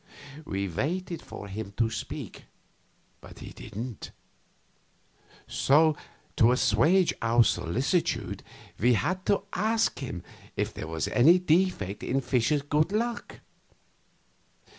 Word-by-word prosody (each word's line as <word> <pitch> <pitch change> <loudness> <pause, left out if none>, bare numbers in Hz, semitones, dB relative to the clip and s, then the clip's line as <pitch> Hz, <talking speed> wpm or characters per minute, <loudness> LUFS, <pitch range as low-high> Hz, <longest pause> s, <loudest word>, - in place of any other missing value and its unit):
We 100 0 -2
waited 170 - -3
for 100 - -9
him 100 0 -6
to 115 -1 +1
speak, 105 - -6 0.8
but - - -13
he - - -9
didn't; 115 0 -7 1.4
so, 155 +3 +4 0.4
to 115 +1 +6
assuage 150 - +3
our 115 +1 +4
solicitude 130 - 0 0.4
we 120 +4 +4
had 185 - -1
to 200 - +2
ask 220 - +1
him 95 -10 -5 0.3
if - - -1
there - - -6
was 80 -2 -2
any 160 +9 +6
defect 170 - +1
in 135 - 0
Fischer's 135 +2 +1
good 150 +4 +1
luck. 235 +3 -3
135 Hz, 115 wpm, -28 LUFS, 110-180 Hz, 1.4 s, to